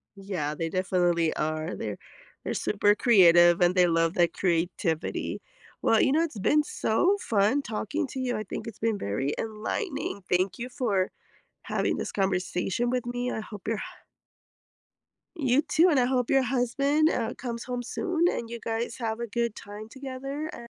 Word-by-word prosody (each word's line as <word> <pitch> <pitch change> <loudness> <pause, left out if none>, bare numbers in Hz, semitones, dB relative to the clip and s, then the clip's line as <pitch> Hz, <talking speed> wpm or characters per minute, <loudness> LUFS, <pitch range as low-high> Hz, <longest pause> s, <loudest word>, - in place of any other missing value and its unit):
Yeah, 180 -7 -3
they 165 0 -2
definitely 175 -3 +1
are, 155 +2 -2
they're 105 -2 -4 0.5
they're - - -2
super 205 0 +2
creative 175 -7 +6
and 175 +1 +3
they 180 -1 +5
love 165 0 +2
that 175 -2 +2
creativity. 170 -2 -1 0.4
Well, 225 - +4
you 265 - +3
know, 315 +4 +3
it's 305 -10 -3
been 300 +9 +3
so 360 - +1
fun 215 - +2
talking 275 +6 -3
to 265 - -6
you, 250 -3 -1
I 215 - -3
think 220 - -6
it's 225 - -8
been 225 -2 0
very 120 - -2
enlightening. 220 - -3
Thank 185 +4 +1
you 245 +2 -5
for 210 -8 0 0.5
having - - -1
this - - -4
conversation 190 +3 0
with 250 -1 -1
me. 245 +1 -2
I - - -3
hope 210 -2 -10
your 225 -1 0
h - - -5 1.6
You 270 -1 +3
too, 320 +4 +4
and 290 -6 +3
I 245 - +3
hope 250 -2 0
your 270 -1 +4
husband, 275 +5 +2
uh, 235 0 -1
comes 235 -2 -5
home 245 -1 -3
soon, 345 - -1
and 230 -1 -4
you 235 - -5
guys 230 +1 -3
have 225 -1 -2
a 235 - -3
good 235 0 -1
time 210 +2 -9
together, 275 +3 -5
a - - -8
225 Hz, 175 wpm, -27 LUFS, 185-255 Hz, 1.6 s, creative